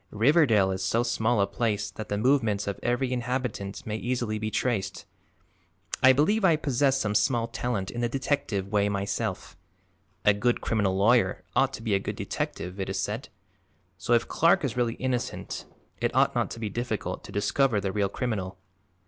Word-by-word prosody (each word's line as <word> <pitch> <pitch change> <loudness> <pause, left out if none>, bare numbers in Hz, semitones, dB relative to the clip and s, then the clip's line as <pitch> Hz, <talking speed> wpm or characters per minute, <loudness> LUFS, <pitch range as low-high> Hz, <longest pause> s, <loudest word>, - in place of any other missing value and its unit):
Riverdale 115 - +4
is 95 0 -3
so 115 +5 +1
small 120 -1 +1
a - - +4
place 105 -2 -1
that 110 - -8
the 105 - -1
movements 110 -4 +2
of 100 - -4
every 125 +1 0
inhabitant 120 -5 -3
may 105 0 -3
easily 120 -2 -2
be 110 0 -2
traced. 100 -4 -2 1.0
I 130 - +8
believe 175 +11 +2
I 170 -4 +5
possess 140 -2 +1
some 105 -4 -1
small 115 +2 +2
talent 115 -5 -3
in 120 - -4
the 120 - +1
detective 115 -7 -1
way 105 -1 +2
myself 100 0 -3 0.7
a 105 - +6
good 120 +4 +1
criminal 100 -4 0
lawyer 105 -1 +3
ought 135 +2 +3
to 110 - -7
be 110 -3 0
a 100 - +3
good - - -4
detective, 90 +2 -4
it 95 - -3
is 95 - -2
said 105 +6 -3 0.7
so 115 - -1
if 115 - +3
Clark 170 +2 +3
is 135 -4 -1
really 120 -1 0
innocent 130 -2 -3 0.3
it - - -1
ought - - +4
not - - 0
to 115 - -7
be 110 - -2
difficult 120 -1 -3
to - - -10
discover 110 +3 +1
the 100 -1 -2
real 100 -1 0
criminal." 100 -5 -3
115 Hz, 180 wpm, -27 LUFS, 100-125 Hz, 1.0 s, I